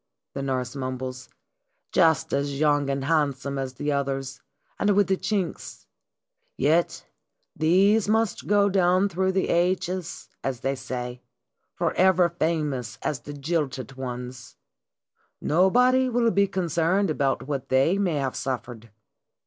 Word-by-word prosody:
the 140 Hz, -, -4 dB
nurse 130 Hz, -2 st, -2 dB
mumbles. 130 Hz, -1 st, -5 dB, 0.3 s
" -, -, -55 dB, 0.3 s
Just 160 Hz, -3 st, +3 dB
as 140 Hz, 0 st, -1 dB
young 145 Hz, -2 st, +2 dB
and 135 Hz, -1 st, -2 dB
handsome 140 Hz, -3 st, 0 dB
as 130 Hz, -1 st, -4 dB
the 145 Hz, +4 st, -2 dB
others, 135 Hz, -1 st, -2 dB, 0.4 s
and 205 Hz, -1 st, +2 dB
with 205 Hz, 0 st, +4 dB
the 190 Hz, -, +1 dB
chinks! 195 Hz, -2 st, -3 dB, 0.7 s
Yet 165 Hz, +3 st, +1 dB, 0.5 s
these 195 Hz, +7 st, +3 dB
must 220 Hz, 0 st, 0 dB
go 205 Hz, 0 st, +4 dB
down 185 Hz, 0 st, +3 dB
through 190 Hz, +1 st, 0 dB
the 190 Hz, -, 0 dB
ages, 180 Hz, 0 st, -1 dB, 0.2 s
as 130 Hz, -2 st, -3 dB
they 135 Hz, -, 0 dB
say, 125 Hz, -2 st, -6 dB, 0.5 s
forever 185 Hz, -1 st, +3 dB
famous 150 Hz, -8 st, -2 dB
as 145 Hz, -, -1 dB
the 145 Hz, +5 st, -9 dB
jilted 140 Hz, -3 st, -3 dB
ones! 125 Hz, -1 st, -7 dB, 0.8 s
Nobody 250 Hz, -, +3 dB
will 235 Hz, -1 st, +2 dB
be 200 Hz, -1 st, +3 dB
concerned 180 Hz, +1 st, 0 dB
about 135 Hz, -3 st, -1 dB
what 140 Hz, -3 st, -4 dB
they 135 Hz, +9 st, +3 dB
may 180 Hz, -6 st, +1 dB
have 135 Hz, -3 st, -2 dB
suffered. 120 Hz, -3 st, -5 dB
150 Hz, 135 wpm, -25 LUFS, 135-185 Hz, 0.8 s, with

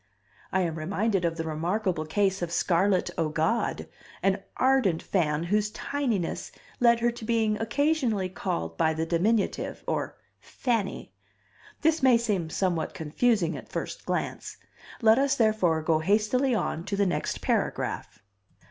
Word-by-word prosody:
I 190 Hz, -, +2 dB
am 165 Hz, -3 st, -2 dB
reminded 195 Hz, +3 st, 0 dB
of 165 Hz, 0 st, -1 dB
the 165 Hz, -, -2 dB
remarkable 165 Hz, +1 st, -1 dB
case 195 Hz, +2 st, +1 dB
of 175 Hz, -1 st, -2 dB
Scarlett 185 Hz, +2 st, +2 dB
O'God, 160 Hz, +8 st, 0 dB, 0.4 s
an 195 Hz, +1 st, +2 dB, 0.2 s
ardent 255 Hz, -11 st, +2 dB
fan 155 Hz, -4 st, 0 dB
whose 210 Hz, +4 st, +1 dB
tininess 235 Hz, -8 st, -2 dB, 0.3 s
led 235 Hz, -2 st, +5 dB
to 235 Hz, -, -7 dB
her 240 Hz, -, +3 dB
being 220 Hz, -1 st, +1 dB
occasionally 245 Hz, -5 st, +1 dB
called 80 Hz, -, -4 dB
by 160 Hz, 0 st, +2 dB
the 160 Hz, +1 st, -1 dB
diminutive, 195 Hz, +6 st, 0 dB
or -, -, -2 dB, 0.2 s
fanny. 230 Hz, -6 st, -3 dB, 0.7 s
This 320 Hz, 0 st, +2 dB
may 260 Hz, -3 st, +6 dB
seem 205 Hz, -8 st, -1 dB
somewhat 175 Hz, -2 st, -1 dB
confusing 170 Hz, +3 st, +1 dB
at -, -, -9 dB
first -, -, -5 dB
glance. -, -, -3 dB, 0.5 s
Let 220 Hz, +2 st, +6 dB
us, 275 Hz, 0 st, +2 dB
therefore, 200 Hz, -8 st, +2 dB
go 155 Hz, 0 st, +2 dB
hastily 215 Hz, +8 st, +2 dB
on 165 Hz, -6 st, -2 dB
to 200 Hz, -, -2 dB
the 200 Hz, 0 st, +2 dB
next 180 Hz, -, -2 dB
paragraph. 105 Hz, -, -2 dB
195 Hz, 140 wpm, -27 LUFS, 165-230 Hz, 0.7 s, may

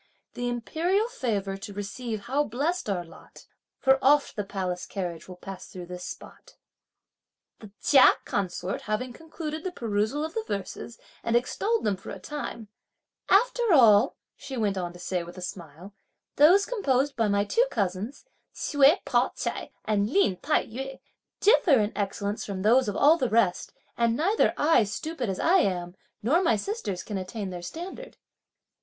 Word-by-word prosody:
The 245 Hz, 0 st, -2 dB
imperial 340 Hz, -, 0 dB
favour 205 Hz, -, -2 dB
to 200 Hz, +1 st, -8 dB
receive 210 Hz, +2 st, -5 dB
how 270 Hz, +7 st, 0 dB
blessed 295 Hz, +4 st, -2 dB
our 185 Hz, -3 st, -1 dB
lot! 165 Hz, -, -16 dB, 0.3 s
For 265 Hz, 0 st, +4 dB
oft 285 Hz, +1 st, +4 dB
the 205 Hz, -, -2 dB
palace 185 Hz, -2 st, -4 dB
carriage 175 Hz, -4 st, -5 dB
will 185 Hz, -, -9 dB
pass 190 Hz, +1 st, -9 dB
through 180 Hz, -1 st, -9 dB
this 180 Hz, 0 st, -8 dB
spot. -, -, -10 dB, 1.0 s
The 215 Hz, -, -11 dB
Chia 270 Hz, -3 st, +7 dB
consort 185 Hz, -1 st, -2 dB
having 240 Hz, +4 st, -2 dB
concluded 315 Hz, +1 st, -6 dB
the 370 Hz, -, -3 dB
perusal 230 Hz, +2 st, -1 dB
of 320 Hz, -, -7 dB
the 450 Hz, -, -1 dB
verses, 205 Hz, +3 st, -5 dB, 0.3 s
and 230 Hz, -, 0 dB
extolled 410 Hz, -, 0 dB
them 200 Hz, -2 st, 0 dB
for 195 Hz, -, -11 dB
a -, -, -6 dB
time: 230 Hz, +1 st, -6 dB, 0.6 s
"After 485 Hz, +5 st, +4 dB
all," 220 Hz, -7 st, +6 dB, 0.2 s
she 265 Hz, -, -7 dB
went 205 Hz, -3 st, 0 dB
on 175 Hz, -2 st, -3 dB
to -, -, -12 dB
say 180 Hz, 0 st, -2 dB
with 175 Hz, +2 st, -11 dB
a -, -, -7 dB
smile, 175 Hz, +2 st, -8 dB, 0.4 s
"those 355 Hz, +8 st, +6 dB
composed 285 Hz, -, 0 dB
by 225 Hz, -2 st, +1 dB
my 200 Hz, 0 st, +2 dB
two 470 Hz, -, +2 dB
cousins, 200 Hz, -, -3 dB, 0.3 s
Hsüeh 290 Hz, +5 st, +3 dB
Pao -, -, +1 dB
ch'ai -, -, -4 dB, 0.2 s
and 210 Hz, -1 st, +1 dB
Lin 305 Hz, -, +2 dB
Tai 300 Hz, -, +1 dB
yü, 270 Hz, +4 st, -7 dB, 0.4 s
differ 390 Hz, -, +5 dB
in 210 Hz, 0 st, -1 dB
excellence 205 Hz, +1 st, -2 dB
from 190 Hz, -2 st, -5 dB
those 235 Hz, +2 st, +4 dB
of 200 Hz, -, -4 dB
all 305 Hz, +8 st, +5 dB
the 255 Hz, -, 0 dB
rest; 215 Hz, -5 st, +1 dB, 0.2 s
and 235 Hz, 0 st, +1 dB
neither 390 Hz, +8 st, +2 dB
I, 295 Hz, -5 st, +4 dB
stupid 245 Hz, +5 st, -4 dB
as 190 Hz, -, -3 dB
I 360 Hz, +3 st, +4 dB
am, 175 Hz, -, -1 dB, 0.3 s
nor 305 Hz, -, +3 dB
my 330 Hz, -11 st, +3 dB
sisters 210 Hz, -, -4 dB
can 205 Hz, -3 st, -4 dB
attain 195 Hz, +1 st, -5 dB
their 175 Hz, -1 st, -6 dB
standard." 360 Hz, -, -8 dB
230 Hz, 170 wpm, -27 LUFS, 195-295 Hz, 1.0 s, Chia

